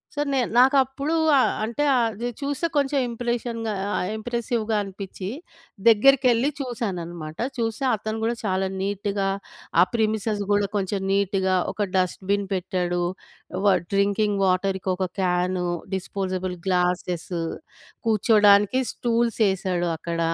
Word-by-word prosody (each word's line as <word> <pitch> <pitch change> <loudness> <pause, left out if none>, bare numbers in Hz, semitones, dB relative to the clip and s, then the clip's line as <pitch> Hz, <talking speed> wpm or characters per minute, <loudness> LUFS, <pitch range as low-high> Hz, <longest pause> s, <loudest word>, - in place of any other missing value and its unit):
So, 290 - 0
నేను 255 -4 +1
నాకప్పుడూ 270 +3 +3 0.3
ఆహ్, - - +3
అంటే, 235 +6 -2 0.2
అది 225 +2 -3
చూస్తే 285 +4 -1
కొంచెం 280 0 +1
ఇంప్రెషన్‌‌గా 235 -1 -2
ఆహ్, - - -2
ఆహ్, 180 - -2
ఇంప్రెసివ్‌గా 230 -1 -1
అనిపిచ్చి, 195 -1 -7 0.6
దగ్గరికెళ్ళి 250 +2 +5
చూసానన్నమాట. 175 - -4 0.2
చూస్తే 225 +1 -2
అతను 215 +1 -4
గూడా 230 +1 +1
చాలా 190 -1 0
నీట్‌గా 200 0 -1 0.5
ఆ - - +9
ప్రెమిసెస్ 220 -2 0
గూడా 205 0 +3
కొంచెం 195 0 -2
నీట్‌గా 190 -1 +1 0.2
ఒక 205 -1 -1
డస్ట్‌బిన్ 195 +2 0
పెట్టాడు. 180 -1 -1 0.6
వా 200 - +6 0.2
డ్రింకింగ్ 200 +1 +2
వాటర్‌కి 190 +1 0
ఒక 185 0 -1
క్యాను, 180 0 0 0.3
డిస్పోజబుల్ 185 -1 -3
గ్లాసెస్, 180 -1 0 0.8
కూర్చోడానికి 210 +1 +5
స్టూల్స్ 235 -1 0
యేశాడక్కడ. 175 -3 -1
205 Hz, 110 wpm, -24 LUFS, 185-230 Hz, 0.8 s, ఆ